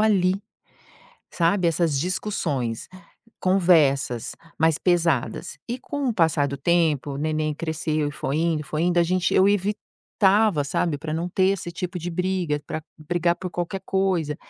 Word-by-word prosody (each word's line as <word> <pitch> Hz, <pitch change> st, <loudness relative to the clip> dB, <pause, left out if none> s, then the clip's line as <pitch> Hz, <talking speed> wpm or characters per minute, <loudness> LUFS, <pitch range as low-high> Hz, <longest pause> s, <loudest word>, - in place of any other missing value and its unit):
ali, 190 Hz, -4 st, +3 dB, 1.0 s
sabe, 175 Hz, +1 st, +2 dB
essas 165 Hz, -4 st, +1 dB
discussões, 145 Hz, -, -2 dB, 0.5 s
conversas 155 Hz, -, +3 dB, 0.3 s
mais 160 Hz, -1 st, +3 dB
pesadas, 165 Hz, -, 0 dB
e 245 Hz, +2 st, -3 dB
com 280 Hz, 0 st, -3 dB
o -, -, +1 dB
passar 160 Hz, -5 st, +2 dB
do 140 Hz, -, -4 dB
tempo, 155 Hz, -4 st, +1 dB
o -, -, -4 dB
neném 155 Hz, 0 st, -1 dB
cresceu 155 Hz, -1 st, -2 dB
e -, -, -7 dB
foi 140 Hz, 0 st, -3 dB
indo 165 Hz, -2 st, +1 dB
e -, -, -13 dB
foi 155 Hz, +2 st, -2 dB
indo, 175 Hz, 0 st, +2 dB
a -, -, +6 dB
gente 185 Hz, +1 st, 0 dB
eu 190 Hz, +1 st, +5 dB
evitava, 205 Hz, -2 st, +1 dB
sabe, 145 Hz, +1 st, -1 dB
pra 155 Hz, 0 st, -4 dB
não 170 Hz, +2 st, -2 dB
ter 190 Hz, +1 st, +2 dB
esse 185 Hz, -3 st, -3 dB
tipo 180 Hz, +1 st, -5 dB
de 175 Hz, +1 st, -4 dB
briga, 180 Hz, -4 st, -1 dB
pra 155 Hz, -, -4 dB, 0.2 s
brigar 170 Hz, +2 st, 0 dB
por 185 Hz, -1 st, -6 dB
qualquer 175 Hz, +2 st, -3 dB
coisa. 180 Hz, -6 st, 0 dB
170 Hz, 160 wpm, -24 LUFS, 150-185 Hz, 1.0 s, a